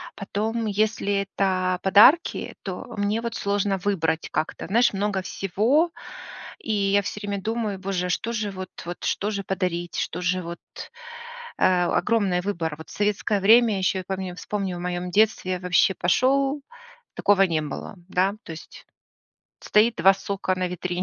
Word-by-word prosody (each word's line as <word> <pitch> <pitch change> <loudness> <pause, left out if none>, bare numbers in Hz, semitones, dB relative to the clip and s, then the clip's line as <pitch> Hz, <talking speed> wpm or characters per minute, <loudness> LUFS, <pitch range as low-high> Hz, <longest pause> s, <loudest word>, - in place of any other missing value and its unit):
Потом, 220 +3 -2
если 210 0 0
это 185 -2 0
подарки, 210 - +5
то 185 -2 -5
мне 205 +3 0
вот 235 0 -4
сложно 200 -1 0
выбрать 165 -5 -1
как-то. 155 +1 -3
Знаешь, 235 +2 +3
много 195 -1 -1
всего, 230 - +1 0.7
и 220 - -4
я 200 0 +2
всё 205 +1 -5
время 200 -1 -3
думаю: 220 -2 -2
боже, 190 -2 -2
а - - -5
что 230 +6 -1
же 215 -3 -2
вот, 185 -1 -7 0.2
вот 175 0 -7
что 205 - -1
же 200 -1 -3
подарить, 175 -2 -2
что - - -3
же 185 +1 0
вот, 170 +1 -7 1.0
э, - - -1 0.2
огромный 190 -2 +1
выбор. 170 -6 -3
Вот 160 - -12
в - - -11
советское 205 0 0
время 225 0 +5
ещё, 190 0 0
я - - -6
помню 190 -2 -4
вспомню 190 -1 -3
в - - -7
моём 180 0 -3
детстве, 200 -3 +2
вообще 180 +1 +3
пошёл, 270 +9 +2 0.5
такого 200 -1 +4
не 165 -4 +1
было, 150 +7 -6
да, 190 +3 +1
то - - -9
есть 160 - -12 0.8
стоит 225 +2 +3
2 190 +3 +6
сока 195 -1 -2
на 185 -1 -1
витрине, 180 0 -3
195 Hz, 165 wpm, -24 LUFS, 180-210 Hz, 1.0 s, 2